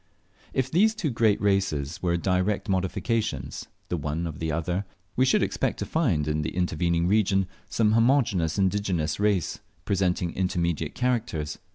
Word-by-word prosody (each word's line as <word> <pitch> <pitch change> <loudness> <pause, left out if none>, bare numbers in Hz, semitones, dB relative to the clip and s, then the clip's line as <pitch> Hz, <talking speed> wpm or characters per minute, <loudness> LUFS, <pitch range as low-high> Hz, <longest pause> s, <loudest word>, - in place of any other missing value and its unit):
If 130 0 -1
these 215 +6 +4
two 175 -10 -1
great 115 -3 +2
races 95 -6 0
were 85 -1 +1
direct 95 +4 0
modifications, 95 +4 -1 0.2
the - - -1
one 75 +3 -2
of 80 -3 -6
the 80 -1 -1
other, 85 +5 -1 0.3
we 130 - +4
should 130 - +3
expect - - -1
to - - -3
find 95 - +1
in 75 0 0
the 75 - -4
intervening 85 -1 +1
region 95 -1 +3 0.2
some 110 -2 +2
homogeneous 115 - +2
indigenous 95 -5 0
race 100 -5 +1 0.3
presenting 90 -3 0
intermediate 85 -4 -1
characters. 115 -12 -1
95 Hz, 150 wpm, -26 LUFS, 85-110 Hz, 0.3 s, these